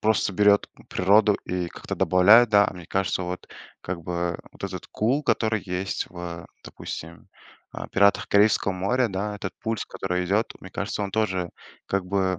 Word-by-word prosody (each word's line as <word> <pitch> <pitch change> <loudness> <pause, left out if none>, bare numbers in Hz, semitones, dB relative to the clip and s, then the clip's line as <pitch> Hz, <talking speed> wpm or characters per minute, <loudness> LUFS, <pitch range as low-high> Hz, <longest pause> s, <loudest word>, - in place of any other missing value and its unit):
просто 110 -2 +1
берет 105 0 +4 0.2
природу 105 +3 +4
и 90 -1 -2
как-то - - -6
добавляет, 105 +6 +6
да. 100 -1 +6
А - - -5
мне 90 -1 -10
кажется, 95 -1 -1
вот 90 +1 -6 0.3
как 90 -1 -5
бы 85 0 -2
вот - - -16
этот - - -6
кул, 130 +8 0
который 110 -5 +1
есть 95 +1 -3
в, 85 -2 -7 0.2
допустим, 80 +1 -8 0.5
э, - - -6
"Пиратах 100 +1 +3
Карибского 100 -1 +3
моря", 115 +7 +1
да. 100 +2 -3
Этот 95 -2 -5
пульс, 110 -1 -2
который 90 -1 -2
идет, 100 +5 +1
вот - - -20
мне 95 - -11
кажется, 100 +1 -3
он 100 - -3
тоже 95 -4 0 0.4
как 100 -1 -1
бы, 95 -1 0
95 Hz, 175 wpm, -25 LUFS, 90-105 Hz, 0.5 s, добавляет